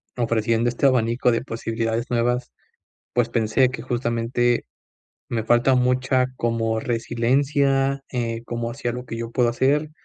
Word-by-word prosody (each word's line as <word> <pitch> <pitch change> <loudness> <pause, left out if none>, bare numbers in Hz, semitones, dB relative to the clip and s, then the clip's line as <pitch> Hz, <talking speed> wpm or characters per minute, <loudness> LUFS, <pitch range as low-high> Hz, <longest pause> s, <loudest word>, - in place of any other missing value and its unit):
ofreciendo 115 0 +1
este 120 +3 -1
abanico 125 -1 +3
de 115 - 0
posibilidades 115 -1 -2
nuevas, 120 +1 0 0.6
pues, 120 -1 +1
pensé 115 +2 +2
que 130 - -6
justamente, 120 0 0 0.6
me 115 -2 -2
falta 120 +3 +3
mucha 125 +1 +2
como 115 -1 0
resiliencia, 135 +4 +1
eh, 115 -2 -2
como 120 0 -3
hacía 120 - -3
lo 125 +1 -6
que 115 - -6
yo 115 0 -5
puedo 120 0 +2
hacer, 140 +5 +1
120 Hz, 135 wpm, -23 LUFS, 115-125 Hz, 0.6 s, abanico